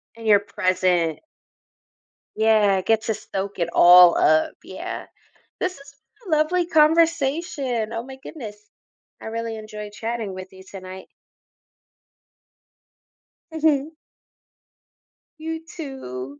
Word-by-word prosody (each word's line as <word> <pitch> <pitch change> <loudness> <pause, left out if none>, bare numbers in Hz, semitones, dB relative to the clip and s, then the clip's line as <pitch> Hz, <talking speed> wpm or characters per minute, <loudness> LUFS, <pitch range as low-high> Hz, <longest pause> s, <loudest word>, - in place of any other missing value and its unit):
And 225 -1 -8
your 205 -2 +6
present. 185 -5 0 1.1
Yeah, 215 -3 +3
get 220 +2 +1
to 220 - -1
soak 195 -1 -6
it 170 - 0
all 175 0 +8
up. 155 0 +3
Yeah. - - -7 0.5
This 365 -4 -2
has 280 0 -16 0.3
been 345 -6 0
a - - +2
lovely 340 +3 +1
conversation. 305 -7 +1
Oh 230 - -3
my 265 +2 -10
goodness. 220 -10 -8 0.6
I - - -10
really 225 0 -4
enjoyed 210 -1 -8
chatting 225 -3 -4
with 185 0 -9
you 190 0 -14
tonight. 185 -1 -10 2.5
Mhm. 310 -2 +1 1.5
You 320 +1 -5
too. 145 - -8
220 Hz, 110 wpm, -23 LUFS, 190-295 Hz, 2.5 s, all